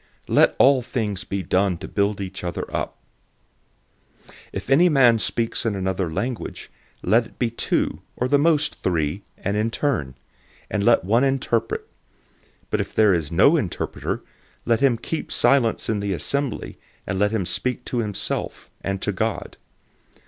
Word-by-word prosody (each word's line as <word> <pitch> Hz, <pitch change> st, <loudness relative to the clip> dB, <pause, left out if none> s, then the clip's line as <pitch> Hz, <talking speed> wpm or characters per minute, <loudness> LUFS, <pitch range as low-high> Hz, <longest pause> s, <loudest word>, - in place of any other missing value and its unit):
Let -, -, +4 dB
all 135 Hz, -1 st, +5 dB
things 105 Hz, -6 st, -3 dB
be 100 Hz, +1 st, -3 dB
done 95 Hz, -1 st, +1 dB
to -, -, -8 dB
build 100 Hz, 0 st, 0 dB
each 95 Hz, -2 st, -6 dB
other 85 Hz, -, -3 dB
up. -, -, -3 dB, 1.3 s
014:027 -, -, -19 dB, 0.2 s
If -, -, -5 dB
any 170 Hz, +6 st, +6 dB
man 125 Hz, -7 st, +5 dB
speaks 115 Hz, +2 st, -1 dB
in 115 Hz, -3 st, 0 dB
another 95 Hz, -2 st, -1 dB
language, 120 Hz, +9 st, -4 dB, 0.3 s
let 115 Hz, +5 st, +3 dB
it -, -, -24 dB
be 120 Hz, -2 st, 0 dB
two, 115 Hz, -, -1 dB
or 125 Hz, -, -1 dB
at 130 Hz, -, -3 dB
the 145 Hz, -, +5 dB
most 150 Hz, -1 st, +2 dB
three, 85 Hz, 0 st, 0 dB, 0.2 s
and 100 Hz, +1 st, -2 dB
in 105 Hz, +2 st, +1 dB
turn; 115 Hz, -, -1 dB, 0.6 s
and 105 Hz, -2 st, 0 dB
let 120 Hz, +1 st, +4 dB
one 115 Hz, +7 st, +3 dB
interpret. 135 Hz, -4 st, 0 dB
014:028 -, -, -30 dB, 0.8 s
But -, -, +1 dB
if -, -, -7 dB
there 105 Hz, -3 st, +5 dB
is 80 Hz, -3 st, -1 dB
no 85 Hz, -, +5 dB
interpreter, -, -, -2 dB, 0.4 s
let 115 Hz, -1 st, +2 dB
him 135 Hz, -4 st, +3 dB
keep 160 Hz, +7 st, -4 dB
silent 120 Hz, -5 st, +3 dB
in 110 Hz, -2 st, 0 dB
the 100 Hz, -1 st, -1 dB
assembly, 140 Hz, +6 st, -2 dB, 0.3 s
and 95 Hz, -, -2 dB
let 105 Hz, 0 st, +3 dB
him 105 Hz, -4 st, -1 dB
speak 125 Hz, +7 st, -2 dB
to 125 Hz, -, -2 dB
himself, 105 Hz, -4 st, -3 dB
and 95 Hz, 0 st, -2 dB
to 105 Hz, -, +1 dB
God. 110 Hz, +4 st, -2 dB
110 Hz, 170 wpm, -23 LUFS, 95-125 Hz, 1.3 s, any